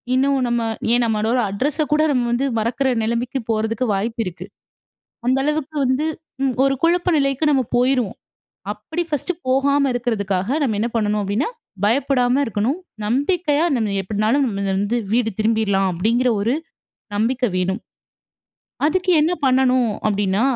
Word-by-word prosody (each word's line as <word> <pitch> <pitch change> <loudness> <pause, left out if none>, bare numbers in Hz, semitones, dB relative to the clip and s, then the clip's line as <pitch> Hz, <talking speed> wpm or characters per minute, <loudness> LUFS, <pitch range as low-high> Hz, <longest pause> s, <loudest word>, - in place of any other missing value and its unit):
இன்னும் 275 +1 +2
நம்ம 240 0 0 0.3
ஏன் 245 - +2
நம்மளோட 225 +2 +1
அட்ரச 285 +9 0
கூட 300 - +3
நம்ம 250 -3 +1
வந்து 240 +3 +1
மறக்கிற 245 +5 0
நிலைமைக்கு 235 +4 -1
போறதுக்கு 220 +2 0
வாய்ப்பு 225 +4 -2
இருக்கு. 180 -1 -6 0.8
அந்த 260 +1 +3
அளவுக்கு 300 0 -2
வந்து. 260 +4 +1 0.4
ம். 260 -2 +1
ஒரு 275 0 +3
குழப்ப 350 +2 +2
நிலைக்கு 275 +2 +1
நம்ம 265 -2 +2
போயிருவோம். 250 -5 +1 0.6
அப்படி 315 +12 -4
ஃபர்ஸ்ட்டு 300 +5 -1
போகாம 280 +2 +3
இருக்கிறதுக்காக 200 -5 -1
நம்ம 220 -7 0
என்ன 235 - 0
பண்ணணும் 210 -1 0
அப்படின்னா, 205 - -1 0.4
பயப்படாம 255 +2 +2
இருக்கணும். 225 - -1 0.3
நம்பிக்கையா 295 - +1
நம்ம 210 -3 -1
எப்படினாலும் 215 +8 +1
நம்ம 200 -3 -3
வந்து 205 +4 0 0.2
வீடு 235 -2 +2
திரும்பிரலாம் 215 -3 +2
அப்படிங்கிற 230 +8 +1
ஒரு 230 +5 +1 0.6
நம்பிக்கை 245 +4 +1
வேணும். 185 +2 0 1.1
அதுக்கு 365 +4 +1
என்ன 315 +3 +2
பண்ணணும் 255 -2 +3 0.2
அப்படின்னா, 205 0 +1
245 Hz, 135 wpm, -20 LUFS, 215-275 Hz, 1.1 s, கூட